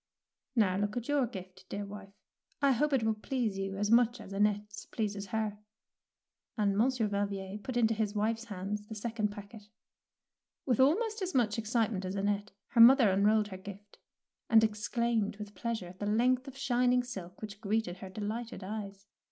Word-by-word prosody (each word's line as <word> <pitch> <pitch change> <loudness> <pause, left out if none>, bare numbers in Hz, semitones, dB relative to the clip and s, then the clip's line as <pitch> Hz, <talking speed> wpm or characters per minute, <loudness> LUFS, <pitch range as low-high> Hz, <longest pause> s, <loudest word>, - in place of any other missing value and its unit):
"Now 195 -5 +3
look 205 +3 -1
at 240 - -3
your 290 -4 +2
gift, 185 -4 -10
dear 205 0 -4
wife. 200 -1 -10 0.4
I 280 -1 +4
hope 295 +4 +2
it 265 -4 +2
will 220 0 +2
please 215 -2 -2
you 195 0 -3
as 205 +1 0
much 240 0 +4
as 195 - -9
Annette's 205 0 0
pleases 205 -3 -3
her"; 215 0 -2 1.0
and 200 -2 +2
Monsieur 235 +1 +2
Valvier 200 -1 -3
put 245 +4 -4
into 225 -2 +3
his 215 -1 -1
wife's 225 +2 0
hands 205 0 -5
the 220 - -7
second 220 0 -1
packet. 205 +1 -10 1.0
With 250 -5 +1
almost 425 - +3
as 370 -4 -3
much 225 -3 +2
excitement 220 -3 0
as 185 +1 -3
Annette, 205 +1 -1 0.2
her 230 - +4
mother 240 -3 +8
unrolled 210 +2 +3
her 190 - -7
gift, 200 +1 -11 0.5
and 225 -1 +7
exclaimed 220 0 0
with 210 -1 -8
pleasure 220 -2 -3
at 185 +1 -14
the 205 - -2
length 250 +5 +2
of 270 0 -9
shining 250 -1 +2
silk 190 -7 -8
which 210 -1 -8
greeted 210 -4 -1
her 190 +1 -8
delighted 215 +2 -5
eyes. 200 -1 -6
210 Hz, 175 wpm, -31 LUFS, 200-235 Hz, 1.0 s, mother